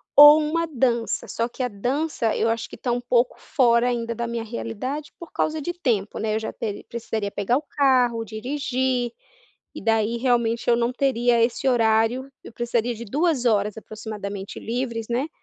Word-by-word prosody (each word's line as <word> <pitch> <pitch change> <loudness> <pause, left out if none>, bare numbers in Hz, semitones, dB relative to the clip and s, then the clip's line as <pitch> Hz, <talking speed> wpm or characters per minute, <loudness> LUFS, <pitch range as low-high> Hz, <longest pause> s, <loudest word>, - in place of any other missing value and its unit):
ou 295 +1 +10
uma 320 +2 0
dança, 240 -5 0
só 230 +1 -2
que 260 - -7
a 250 - +1
dança 245 +3 -1
eu - - +1
acho 225 0 -2
que - - -9
está 245 -2 -2
um 245 - -1
pouco 245 0 +2
fora 240 -1 +2
ainda 235 -1 -2
da 235 +1 -2
minha 235 -1 -3
realidade, 250 +6 -5
por 340 - -9
causa 310 0 -1
de 345 +5 -3
tempo, 235 - -1
né. 215 0 -1
Eu - - +1
já 220 - -5
teri 210 -3 -5
precisaria 220 -3 -3
pegar 205 +5 0
o - - -3
carro, 255 -6 +2
dirigir, 250 +1 -1 0.6
e - - -8
daí 225 0 +1
realmente 235 -2 +1
eu 235 - +6
não 235 +1 0
teria 245 -3 +2
esse 240 +3 +1
horário. 230 +2 +2
Eu - - -11
precisaria 240 0 -1
de 230 +1 -8
2 290 - 0
horas 210 -3 +2
aproximadamente 210 -3 -7
livres, 235 -1 -3
né, 245 +5 -1
235 Hz, 185 wpm, -24 LUFS, 225-260 Hz, 0.6 s, ou